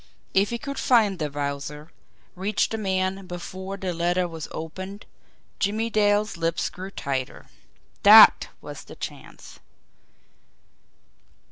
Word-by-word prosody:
If 195 +1 +3
he 235 - -3
could 280 +4 -6
find 215 -7 +3
the 150 -2 -2
Wowzer, 145 +1 -5 0.4
reach 195 +3 0
the 225 - -4
man 190 -1 -1
BEFORE 185 +2 -7
THE 185 -2 -3
LETTER 175 +2 0
WAS 165 -2 -7
OPENED 190 +6 -7 0.5
Jimmie 220 +3 -1
Dale's 205 -2 +2
lips 165 0 -1
grew 185 +1 -8
tighter. 135 -8 -4 0.6
THAT - - +9
was - - -9
the - - -12
chance! - - -10
185 Hz, 120 wpm, -24 LUFS, 165-205 Hz, 0.6 s, THAT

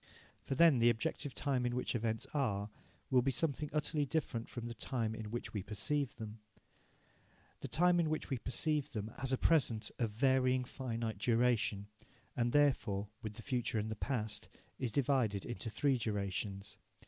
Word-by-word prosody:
For 135 - -3
then 160 -3 +6
the 120 +1 +6
objective 120 +4 -1
time 135 -4 0
in 120 0 0
which 125 - -1
events 115 -1 -1
are 105 -8 0 0.4
will 130 -1 +6
be 135 - +1
something 145 +2 0
utterly 150 0 +1
different 140 -6 -2
from 120 -2 -6
the 120 - -4
time 115 -3 -2
in 110 -1 -6
which 120 +2 -4
we 105 - -1
perceive 125 +8 -1
them. 110 0 -7 1.2
The - - -5
time 175 +1 +4
in 165 -2 +2
which 155 - -2
we 130 - 0
perceive 150 +4 -1
them 110 -1 -3
has 130 0 -1
a 130 - +3
present 125 -10 +2
of 115 -3 +1
varying 130 +2 +3
finite 115 -4 -4
duration, 115 -3 +2 0.5
and, 120 0 +1
therefore, 120 -9 +2
with 110 -1 -5
the 115 - -9
future 125 -4 -1
and 110 +1 -1
the - - -2
past, 110 -2 -2 0.3
is 125 -3 -1
divided 125 -7 +1
into 120 -1 -4
three 130 +4 +1
durations. 100 -2 -2
120 Hz, 170 wpm, -35 LUFS, 110-135 Hz, 1.2 s, then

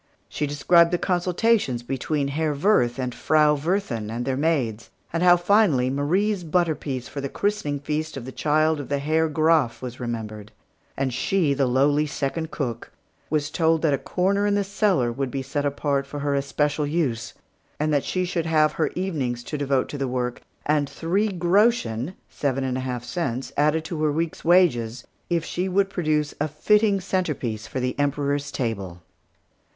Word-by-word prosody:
She 150 - -2
described 170 +4 +4
the 175 - +1
consultations 180 - +1
between 140 +3 -1
the 140 - -3
Herr 155 0 0
Wirth 140 - +2
and 125 -2 -3
the - - -14
Frau 150 -1 +4
Wirthin 145 - -2
and 120 +2 -3
their 135 - 0
maids; 130 -8 -1 0.2
and 165 - 0
how, 175 0 +7
finally, 175 - +3
Marie's 180 +8 0
butter 170 0 +1
piece 135 -4 -5
for 140 - -6
the 140 - -3
christening 200 -8 -1
feast 155 +1 -3
of 125 - -6
the 130 - -6
child 155 +2 +1
of 145 - -7
the 140 - +1
Herr 155 +3 +1
Graf 155 -5 +2
was 125 -1 -7
remembered; 110 -3 -5 0.5
and 135 -2 -1
she, 155 +3 +1
the 135 -1 +1
lowly 145 +4 +2
second 150 +3 -3
cook, 120 -7 -4 0.4
was 150 0 0
told 160 -1 +2
that 155 -3 +3
a 135 - 0
corner 200 +3 0
in 205 - +2
the 205 - +1
cellar 195 - +1
would 135 +2 -2
be 135 +1 -3
set 145 +2 -1
apart 140 -1 -1
for 145 +1 -6
her 145 0 0
especial 145 +1 0
use, 135 -8 -1 0.4
and 155 0 +1
that 145 - +2
she 185 0 -1
should 170 -2 -2
have 155 -1 +3
her 155 0 0
evenings 140 -10 -2
to 150 - -5
devote 140 -2 0
to 145 - -6
the 135 - -1
work, 125 -1 -2 0.2
and 145 -2 +1
three 190 +6 0
groschen 180 - +1
(seven 135 -2 -2
and 130 -1 -1
a - - -3
half 125 -2 -4
cents) 135 -4 -3
added 150 +2 +2
to 160 -1 -4
her 155 -1 +2
week's 165 +2 -2
wages, 130 -10 +3 0.2
if 170 -2 0
she 185 +2 -2
would 195 +1 +1
produce 155 -5 0
a 150 - +2
fitting 205 +7 +2
centrepiece 150 - -2
for 130 - -4
the 125 0 -1
Emperor's 145 0 0
table. 95 - -4
150 Hz, 185 wpm, -24 LUFS, 130-170 Hz, 0.5 s, how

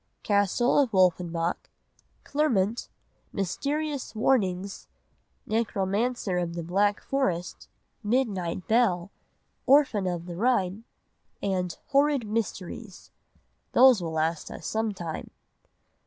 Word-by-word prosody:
Castle 205 +6 +2
of 260 -6 +2
Wolfenbach, 175 -2 +1 0.5
Clermont, 235 -7 0 0.4
Mysterious 280 - -2
Warnings, 200 -5 0 0.6
Necromancer 210 -1 0
of 170 -1 -3
the 170 - -4
Black 200 +4 +1
Forest, 185 -11 -2 0.3
Midnight 205 -7 -1
Bell, 205 -6 +2 0.6
Orphan 260 -8 +4
of 175 -2 -3
the 175 -1 -7
Rhine, 210 -1 0 0.6
and 185 -3 -1
Horrid 280 -3 +3
Mysteries. 210 -2 -5 0.6
Those 255 -5 +7
will 165 -2 -4
last 160 +1 -1
us - - -9
some 220 0 -1
time. 170 -5 -6
200 Hz, 95 wpm, -27 LUFS, 180-240 Hz, 0.6 s, Those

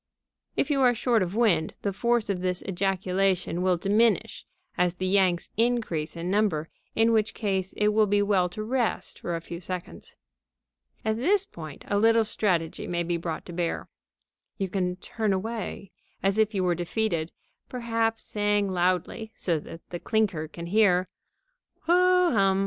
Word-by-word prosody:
If - - +1
you 275 -2 +2
are 245 -2 +5
short 230 -1 +2
of 185 +1 -2
wind, 190 -9 +2
the 200 - -1
force 235 +2 +1
of 195 -3 -1
this 180 0 0
ejaculation 190 -1 0
may 185 -1 +3
diminish 205 +3 +1 0.3
as 180 0 +1
the 185 - -3
yanks 185 -2 +2
increase 225 -10 0
in 170 +2 -3
number, 195 -7 +1 0.3
in 225 +1 +4
which 220 -1 +1
case 190 -3 -1
it 210 0 +3
will 215 0 +3
be 205 0 +3
well 190 -3 +2
to 215 +5 -6
rest 240 0 -1
for 170 - -3
a 165 - -4
few 170 +1 -8
seconds. 180 0 -7 0.9
At 220 0 +1
this 390 - +2
point 155 - -10
a 205 - +1
little 225 +1 +5
strategy 180 -6 -1
may 175 -1 -1
be 170 0 -1
brought 165 -1 -5
to 175 - -9
bear. 170 -1 -2 0.7
You 195 -2 -2
can 180 -1 -1
turn 210 +2 -2
away, 200 -1 -4 0.3
as 195 +2 +2
if 215 0 +2
you 190 - +1
were 180 -1 +2
defeated, 175 -1 -1 0.4
perhaps 230 -2 -1
saying 205 -1 0
loudly, 185 +5 0
so 170 -4 0
that 165 +2 -11
the 175 - -4
clinker 200 -9 0
can 170 +2 -8
hear: 185 -1 +3 0.8
"Ho 360 +1 +4
hum! 195 -4 +3
195 Hz, 165 wpm, -27 LUFS, 180-220 Hz, 0.9 s, are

